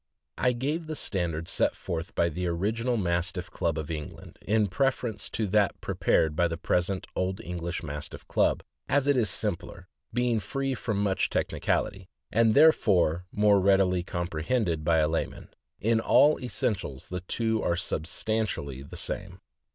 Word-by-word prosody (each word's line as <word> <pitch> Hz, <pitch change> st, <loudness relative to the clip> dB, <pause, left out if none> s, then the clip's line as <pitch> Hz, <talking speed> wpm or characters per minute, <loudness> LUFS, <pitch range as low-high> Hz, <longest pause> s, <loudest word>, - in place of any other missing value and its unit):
I 125 Hz, -, +3 dB
give 150 Hz, +7 st, -2 dB
the 155 Hz, -, -4 dB
standard 85 Hz, -, -2 dB
set -, -, +1 dB
forth 85 Hz, +2 st, -5 dB
by 85 Hz, -, +3 dB
the 90 Hz, +3 st, -3 dB
original 110 Hz, +8 st, 0 dB
Mastiff 90 Hz, -1 st, -1 dB
Club 80 Hz, -1 st, -1 dB
of 80 Hz, 0 st, -4 dB
England, 75 Hz, -2 st, -7 dB
in 110 Hz, 0 st, +2 dB
preference 120 Hz, 0 st, -1 dB
to 110 Hz, -, -1 dB
that 105 Hz, 0 st, +2 dB
prepared 80 Hz, -1 st, +1 dB
by 85 Hz, +2 st, +3 dB
the 80 Hz, -1 st, -4 dB
present 90 Hz, +2 st, 0 dB
Old 95 Hz, +1 st, -1 dB
English 85 Hz, 0 st, -4 dB
Mastiff 75 Hz, -1 st, -7 dB
Club, -, -, +2 dB, 0.3 s
as 145 Hz, 0 st, +2 dB
it 145 Hz, -, +4 dB
is 115 Hz, -5 st, +2 dB
simpler, 90 Hz, 0 st, -3 dB, 0.2 s
being 120 Hz, -1 st, +1 dB
free 135 Hz, +5 st, -2 dB
from 115 Hz, -4 st, -2 dB
much 100 Hz, -2 st, +1 dB
technicality, 95 Hz, -2 st, -1 dB, 0.2 s
and 115 Hz, -1 st, +4 dB
therefore 90 Hz, -, +4 dB
more 105 Hz, -1 st, +4 dB
readily 95 Hz, -2 st, +3 dB
compre 85 Hz, -3 st, -3 dB
hended 85 Hz, -8 st, 0 dB
by 80 Hz, +1 st, +3 dB
a 75 Hz, -1 st, +3 dB
layman. 80 Hz, +1 st, -3 dB, 0.3 s
In 115 Hz, +2 st, +2 dB
all 145 Hz, +6 st, +5 dB
essentials 105 Hz, -, -3 dB
the 90 Hz, -, -3 dB
two 110 Hz, +4 st, -1 dB
are 85 Hz, -, +1 dB
sub 85 Hz, -3 st, -3 dB
stantially 85 Hz, -, -2 dB
the -, -, -8 dB
same. -, -, -4 dB
95 Hz, 160 wpm, -28 LUFS, 85-115 Hz, 0.3 s, all